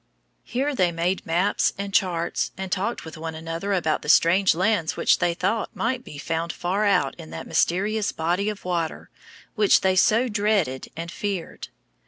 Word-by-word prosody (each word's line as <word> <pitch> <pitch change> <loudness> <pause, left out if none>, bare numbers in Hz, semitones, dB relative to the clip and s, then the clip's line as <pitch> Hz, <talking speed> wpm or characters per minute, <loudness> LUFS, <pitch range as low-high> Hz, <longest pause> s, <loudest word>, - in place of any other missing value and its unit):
Here 275 +5 -1
they 180 -9 +2
made 175 +3 -1
maps 175 +5 +1
and 200 0 -5
charts, 170 -4 0
and 190 -1 -5
talked 200 +3 -2
with 160 0 -9
one 160 0 -5
another 165 +5 -4
about 165 -5 +1
the 150 - -6
strange 180 +3 +5
lands 180 -2 +1
which - - +3
they 170 -1 +1
thought 210 +5 -1
might 250 +2 -1
be 150 - -10
found 165 +3 -2
far 190 +4 -1
out 195 -3 +2
in 160 -1 -9
that - - -7
mysterious 205 +4 +1
body 175 +6 0
of 210 -3 -7
water 170 -3 -3 0.4
which 210 -3 +4
they 190 0 +2
so 220 +6 +4
dreaded 205 - 0
and 170 +1 -5
feared. 195 -4 -4
185 Hz, 175 wpm, -24 LUFS, 165-205 Hz, 0.4 s, strange